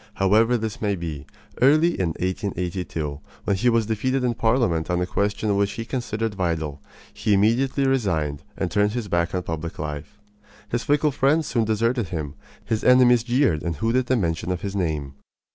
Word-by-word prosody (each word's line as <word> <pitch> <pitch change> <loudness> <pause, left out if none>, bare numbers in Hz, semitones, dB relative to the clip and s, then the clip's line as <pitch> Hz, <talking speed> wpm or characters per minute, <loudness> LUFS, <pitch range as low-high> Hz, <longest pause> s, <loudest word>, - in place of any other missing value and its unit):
However 110 +5 +3
this 110 -2 -5
may 100 -2 +1
be, 80 -5 -6 0.3
early 155 +6 +5
in 90 - +1
1882, 90 -5 -3 0.2
when 100 - +1
he 120 +6 +2
was 115 -2 +2
defeated 130 +5 -1
in 125 -1 +1
Parliament 110 -9 +1
on 90 0 +1
a 90 - 0
question 100 +2 0
which 100 0 +1
he 115 - -5
considered 115 -3 -3
vital, 80 -6 -2 0.3
he 105 -1 +1
immediately 125 +7 +2
resigned 80 - 0 0.2
and 90 -3 -2
turned 105 +2 +2
his 120 -3 -3
back 85 -1 0
on 90 - -1
public 80 0 -5
life. 75 +7 -6 0.5
His 120 +2 -1
fickle 150 +1 +2
friends 145 +4 +2
soon 115 -5 0
deserted 115 +1 0
him. 75 -4 -4 0.3
His 110 -1 -1
enemies 125 -1 +6
jeered 120 - +1
and 85 -1 -2
hooted 115 - 0
the 130 - +2
mention 85 -2 -1
of 90 -1 -3
his 100 0 -4
name. 75 -7 -2
105 Hz, 180 wpm, -23 LUFS, 85-120 Hz, 0.5 s, enemies